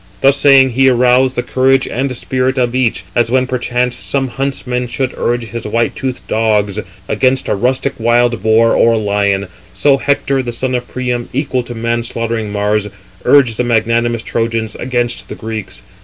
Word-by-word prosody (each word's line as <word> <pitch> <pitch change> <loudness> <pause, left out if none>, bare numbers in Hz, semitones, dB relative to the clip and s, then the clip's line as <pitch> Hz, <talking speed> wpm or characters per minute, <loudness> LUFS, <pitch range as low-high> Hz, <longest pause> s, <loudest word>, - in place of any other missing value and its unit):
Thus 135 +1 +5
saying, 135 -2 +5
he 135 +2 +4
aroused 125 +1 +3
the 120 - -1
courage 135 +1 +2
and 130 +1 -2
spirit 130 +1 -1
of 120 -1 +1
each. 125 -6 0
As 120 -1 +2
when 130 +1 +2
perchance 125 -1 -1
some 135 -2 -2
huntsman 125 -1 -3
should 130 +1 -2
urge 120 0 -1
his 115 -1 -6
white 115 +2 0
toothed 130 -2 -5
dogs 105 -2 +1 0.3
against 130 +4 +1
a - - +1
rustic 130 +6 0
wild 120 0 +2
boar 110 +1 +3
or 115 0 +4
lion; 100 -2 0 0.3
so 140 -2 +3
Hector, 135 -1 0
the 120 -2 -4
son 130 +2 -2
of 125 -1 -2
Priam, 125 -1 -3
equal 130 -1 -1
to 120 0 -8
man 115 +1 -1
slaughtering 115 -2 -3
Mars, 105 0 0 0.4
urged 130 -6 +4
the - - +1
magnanimous 115 0 +1
Trojans 115 -1 -2
against 120 -1 -3
the - - -6
Greeks. 110 -4 -6
120 Hz, 170 wpm, -15 LUFS, 115-130 Hz, 0.4 s, Thus